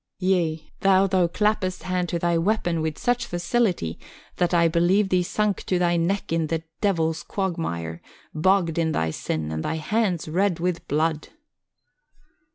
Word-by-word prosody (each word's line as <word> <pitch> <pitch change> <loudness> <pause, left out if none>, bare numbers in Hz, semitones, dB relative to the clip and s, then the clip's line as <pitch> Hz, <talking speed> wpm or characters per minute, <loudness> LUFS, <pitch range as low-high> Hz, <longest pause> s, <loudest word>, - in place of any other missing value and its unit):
Yea, 170 -4 0
though 195 0 +4
thou 185 -2 +2
clappest 200 0 0
hand 180 -1 -1
to 170 - -1
thy 170 0 +1
weapon 175 -2 +1
with 155 -1 -2
such 245 -1 0
facility 175 - 0 0.4
that 175 -1 +1
I 170 -1 +4
believe 175 +5 +2
thee 185 -1 +3
sunk 205 +2 -1
to 185 - +2
thy 175 -1 +2
neck 170 +1 0
in 165 -1 +1
the 160 0 -2 0.2
Devil's 165 -5 +1
quagmire, 165 - -3 0.3
bogged 170 0 +2
in 160 -1 +1
thy 80 - 0
sin, 80 0 -3
and 80 0 -3
thy - - -1
hands 180 +2 0
red 180 +2 +1
with 175 0 -2
blood." 155 +1 0
175 Hz, 160 wpm, -24 LUFS, 160-190 Hz, 0.4 s, though